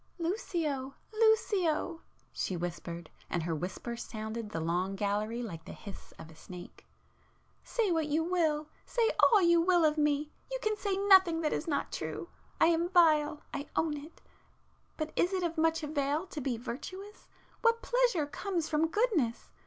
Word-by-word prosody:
"Lucio!... 330 - -2 0.2
Lucio!" 390 -7 +2 0.3
she 185 - -2
whispered, 170 -1 -5 0.2
and 175 - -1
her 165 0 -1
whisper 180 +9 -4
sounded 220 -1 -5
through 165 - -2
the 160 - -3
long 180 +3 0
gallery 210 +4 -1
like 165 -8 -7
the - - -8
hiss 200 -2 -10
of 160 - -11
a - - -15
snake—"Say 185 - -7
what 320 -2 +1
you 305 +2 +1
will—say 330 +6 0
all 425 -5 +6
you 340 -1 +5
will 350 -1 +4
of 305 0 +2
me,—you 300 +11 -1
can 430 0 +1
say 400 -2 -1
nothing 380 -4 +6
that 305 - 0
is 315 - -2
not 290 -3 -1
true. - - -5 0.3
I - - +6
am 335 +1 +2
vile—I 305 -4 +2
own 315 -2 +1
it. 295 +3 -11 0.7
But 310 -1 -3
is 360 +3 +2
it 370 -1 0
of 335 -1 -1
much 325 0 +2
avail 295 +2 0
to 315 -5 -6
be 250 -3 -1
virtuous? 370 - -8 0.3
What 460 0 +3
pleasure 485 -11 +2
comes 340 +2 -2
from 315 +1 +2
goodness? 330 - 0
310 Hz, 160 wpm, -31 LUFS, 240-365 Hz, 0.7 s, all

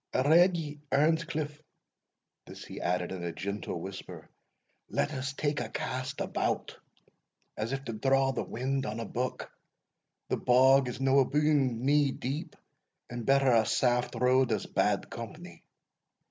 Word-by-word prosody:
I 130 - +3
redd 175 +3 +6
ye, 150 -2 -5
Earnscliff" 155 0 +1 0.9
(this - - -10
he - - -8
added 90 0 -1
in 95 -2 -5
a 85 - -2
gentle 100 0 -4
whisper), 95 +2 -9 0.6
"let 150 - -1
us 135 0 -3
take 145 +1 -1
a 115 - -4
cast 130 +3 -4
about, - - -2 0.8
as 110 +3 -3
if 135 0 -3
to 115 - -4
draw 135 +4 +2
the 130 - -2
wind 135 +3 -2
on 110 +2 -4
a 115 - -3
buck 125 +4 -4 0.8
the - - -1
bog 130 +2 +5
is 125 - -6
no 135 +1 +4
abune 135 -4 +2
knee 145 0 +3
deep, 135 +4 -5 0.6
and 120 -1 -5
better 135 -1 +4
a 115 -2 +5
saft 125 +2 +1
road 125 +2 +3
as - - -1
bad - - 0
company." - - -9
130 Hz, 150 wpm, -30 LUFS, 120-145 Hz, 0.9 s, redd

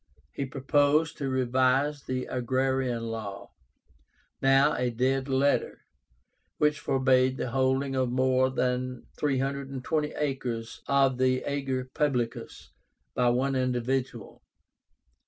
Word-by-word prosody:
He 135 - -4
proposed 145 +4 +2
to 140 -2 -2
revise 130 +3 +1
the 130 0 -2
Agrarian 130 -1 -1
Law, 105 -3 -7 0.9
now 135 +3 +4
a 125 -3 0
dead 130 +3 0
letter, 135 +2 +1 0.8
which 150 0 +2
forbade 130 -1 +2
the 125 - -3
holding 135 +1 +1
of 130 -1 +1
more 130 +1 +2
than 125 -1 -2
320 140 +1 -1
acres 125 -6 -3
of 135 -2 +2
the 130 0 +2
ager 135 -2 -2
publicus 130 -7 -2 0.4
by 125 -1 +2
one 130 +3 +1
individual. 125 0 -2
130 Hz, 105 wpm, -28 LUFS, 125-135 Hz, 0.9 s, now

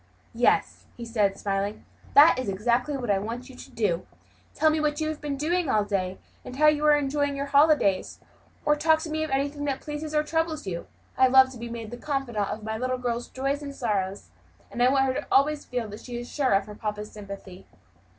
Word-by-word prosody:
"Yes," 240 +1 +1
he 235 - -6
said, 210 -4 +1
smiling, 200 +1 -2 0.3
"that 290 -1 +8
is 255 -5 -2
exactly 240 +8 0
what 240 -5 -1
I 195 - +2
want 235 +5 -6
you 260 - -12
to - - -11
do. 195 -7 -1 0.5
Tell 310 +1 +4
me 310 - 0
what 300 0 0
you 310 0 -1
have 310 - -5
been 290 -2 -3
doing 330 +2 0
all 210 -3 +3
day, 190 -2 -2 0.3
and 250 - -8
how 305 +3 +3
you 300 0 +4
are 300 - +7
enjoying 285 0 0
your 280 0 -2
holidays; 285 -9 +3 0.5
or 295 0 +4
talk 315 +1 +3
to 315 - -5
me 315 0 -1
of 315 - -3
anything 285 +2 -1
that 275 -2 -1
pleases, 300 +1 -5
or 300 - +3
that - - -17
troubles 320 -3 -1
you. 170 -3 -5 0.3
I 260 - +7
love 260 0 +6
to 250 - -10
be 235 0 -6
made 230 -2 -7
the 240 - -6
confidant 250 -7 -2
of 215 - -5
my 220 0 -3
little 255 +1 -1
girl's 245 -1 -3
joys 275 +2 -2
and 280 -1 -7
sorrows; 200 -5 -2 0.4
and 240 - -4
I 250 - +6
want 270 0 +3
her 290 - -4
always 295 +2 +3
to - - -30
feel 245 -3 -2
that 210 - -8
she 245 -1 -7
is 240 0 -6
sure 270 -5 0
of 195 0 +2
papa's 210 -1 -4
sympathy." 195 -2 -10
255 Hz, 230 wpm, -26 LUFS, 215-295 Hz, 0.5 s, that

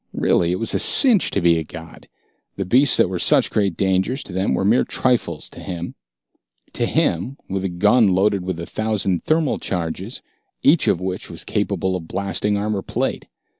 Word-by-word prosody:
Really, 85 0 +1
it 90 - -1
was 115 - 0
a - - +1
cinch 240 -9 +4
to 100 - -1
be 85 -1 +3
a - - -3
god. 80 +1 -12 0.5
The 100 - -3
beasts 130 +8 +4
that - - +4
were 90 -1 -4
such - - +3
great 100 -5 0
dangers 95 +8 0
to 95 - -10
them 95 +2 0
were 95 - -1
mere 110 +5 +3
trifles 125 -2 -1
to - - -12
him. 85 -2 -6 0.8
To - - 0
him, 120 +12 -1
with 95 0 -3
a 95 - -1
gun 105 +6 +3
loaded 95 +1 +2
with 90 -2 -4
a 85 - -5
thousand 105 -4 -1
thermal 155 -2 +1
charges 90 +5 -4 0.4
each 155 +3 +4
of 85 - +2
which 95 0 -4
was - - -8
capable 95 0 -1
of 85 -3 -6
blasting 100 +2 -1
armor 105 -1 -2
plate. - - -3
95 Hz, 190 wpm, -21 LUFS, 90-110 Hz, 0.8 s, cinch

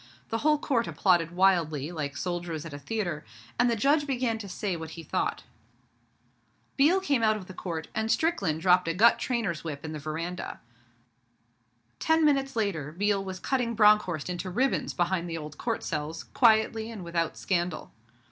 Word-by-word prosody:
The 225 - -1
whole 300 +2 +3
Court 250 -5 0
applauded 175 -4 +2
wildly, 170 -6 +2
like 145 -4 -4
soldiers 175 -3 -3
at 160 - -8
a 145 - -6
theatre, 175 -2 -3 0.4
and 245 - +4
the 235 - +2
Judge 290 +6 +2
began 245 -4 0
to 200 -2 -7
say 190 0 -2
what 160 -1 -6
he 165 - -7
thought. - - -2 1.3
Biel 310 +7 +4
came 285 -10 +1
out 215 -1 +3
of 195 - -9
the 185 - -10
Court, 165 -3 -5
and 220 0 -1
Strickland 195 - +1
dropped 180 0 +4
a 165 - 0
gut 230 +5 +5
trainer's 225 -10 -2
whip 155 -2 -6
in 155 - -5
the 155 - -5
veranda. 165 +4 -5 1.4
Ten 320 - +3
minutes 275 -3 +2
later, 180 -10 -1
Biel 200 +3 0
was 190 -1 -6
cutting 245 -1 -1
Bronckhorst 210 -7 +4
into 180 +1 -4
ribbons 255 +9 0
behind 175 -1 0
the 165 - -3
old 150 -1 -8
Court 230 -2 -2
cells, 155 0 -3
quietly 220 -1 +3
and 220 -5 -7
without 170 -1 -2
scandal. 175 -2 -2
185 Hz, 175 wpm, -28 LUFS, 165-230 Hz, 1.4 s, gut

